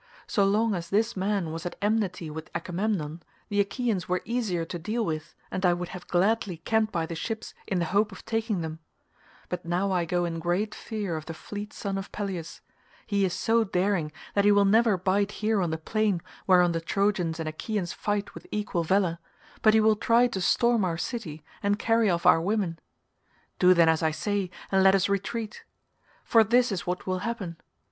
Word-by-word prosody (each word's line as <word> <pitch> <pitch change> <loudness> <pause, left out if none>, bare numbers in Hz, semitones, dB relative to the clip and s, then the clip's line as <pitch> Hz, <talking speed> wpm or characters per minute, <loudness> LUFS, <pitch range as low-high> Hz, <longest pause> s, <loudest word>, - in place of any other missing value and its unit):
So 205 - +1
long 210 +3 +2
as 170 -3 -4
this 220 +3 +1
man 190 -3 -1
was 165 +1 -5
at 175 - -5
enmity 200 -6 0
with 160 +1 -7
Agamemnon 175 -3 -2 0.3
the 205 - 0
Achaeans 200 -1 0
were 180 0 0
easier 215 -9 -1
to 175 +1 -6
deal 220 +7 -1
with, 155 -1 -4 0.2
and 185 - -3
I 180 -1 +5
would 175 0 -5
have 180 -1 -9
gladly 190 0 +1
camped 220 +6 +1
by 170 -3 -1
the 165 - -6
ships 220 +6 -4
in 190 - 0
the 170 - +1
hope 205 +5 +1
of 190 - -12
taking 225 -4 -1
them; 160 0 -5 0.7
but 180 - -4
now 180 +4 0
I 180 -2 +1
go 175 +1 0
in 165 -1 -3
great 180 +6 0
fear 205 -6 -4
of 155 - -8
the 165 - -5
fleet 205 +5 -7
son 195 -1 -3
of 195 - -8
Peleus; 185 -6 -5 0.4
he 200 -2 +1
is 180 - -1
so 230 0 +2
daring 185 -5 0 0.2
that 200 - +3
he 205 - +6
will 205 0 +5
never 220 0 +4
bide 195 +3 +1
here 215 -1 +1
on 175 - 0
the 160 - -2
plain 205 +1 0 0.2
whereon 180 -2 +5
the 165 0 -2
Trojans 180 -3 0
and 160 - -3
Achaeans 175 +3 -3
fight 205 -1 -2
with - - -11
equal 205 -5 -1
valour, 175 -1 +1 0.4
but 215 0 +5
he - - +6
will 215 0 +5
try 235 +3 +4
to 215 -6 -2
storm 235 +3 +3
our 170 -3 0
city 165 -8 -5 0.2
and 205 0 +1
carry 225 -1 +2
off 170 -1 0
our 165 - +6
women. 185 -3 -1 0.8
Do 180 0 +6
then 170 -1 +5
as 160 -1 +3
I 160 - +3
say, 195 +4 -2 0.2
and 195 0 +4
let 190 0 +6
us 190 - +2
retreat. 215 +2 -3 0.6
For 225 -1 +5
this 240 +3 +3
is 185 -3 -3
what 180 0 -2
will 185 -1 -1
happen. 200 -6 -4
195 Hz, 205 wpm, -27 LUFS, 170-215 Hz, 0.8 s, he